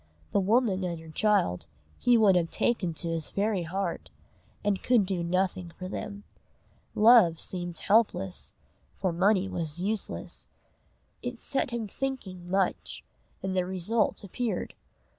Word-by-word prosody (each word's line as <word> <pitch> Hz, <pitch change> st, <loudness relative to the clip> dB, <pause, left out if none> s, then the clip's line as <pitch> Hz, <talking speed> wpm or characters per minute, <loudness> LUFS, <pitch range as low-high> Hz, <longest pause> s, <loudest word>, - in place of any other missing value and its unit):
The -, -, +3 dB
woman 200 Hz, -1 st, +2 dB
and 170 Hz, -2 st, -3 dB
her 160 Hz, 0 st, -11 dB
child 180 Hz, -, +1 dB, 0.3 s
he 245 Hz, -1 st, +5 dB
would 205 Hz, -4 st, +5 dB
have 170 Hz, -2 st, +2 dB
taken 185 Hz, -9 st, 0 dB
to 170 Hz, -, -2 dB
his 165 Hz, -2 st, -2 dB
very 200 Hz, -1 st, 0 dB
heart, 190 Hz, +4 st, -3 dB, 0.5 s
and 200 Hz, -2 st, +1 dB
could 240 Hz, -5 st, +3 dB
do 185 Hz, -2 st, -1 dB
nothing 180 Hz, 0 st, -1 dB
for 185 Hz, -, -5 dB
them. 205 Hz, +2 st, -6 dB, 0.7 s
Love 210 Hz, -7 st, +6 dB
seemed 175 Hz, -2 st, -5 dB
helpless, 205 Hz, -, +1 dB, 0.4 s
for 185 Hz, -3 st, 0 dB
money 190 Hz, +2 st, +3 dB
was 165 Hz, -3 st, -3 dB
useless. 205 Hz, +3 st, -3 dB, 0.7 s
It 245 Hz, -1 st, -5 dB
set 275 Hz, 0 st, -1 dB
him 235 Hz, -2 st, -3 dB
thinking 195 Hz, -9 st, -5 dB
much, 190 Hz, 0 st, -1 dB, 0.4 s
and 190 Hz, 0 st, -2 dB
the 185 Hz, -, +2 dB
result 190 Hz, +6 st, 0 dB
appeared. 225 Hz, +4 st, -3 dB
190 Hz, 140 wpm, -28 LUFS, 175-215 Hz, 0.7 s, Love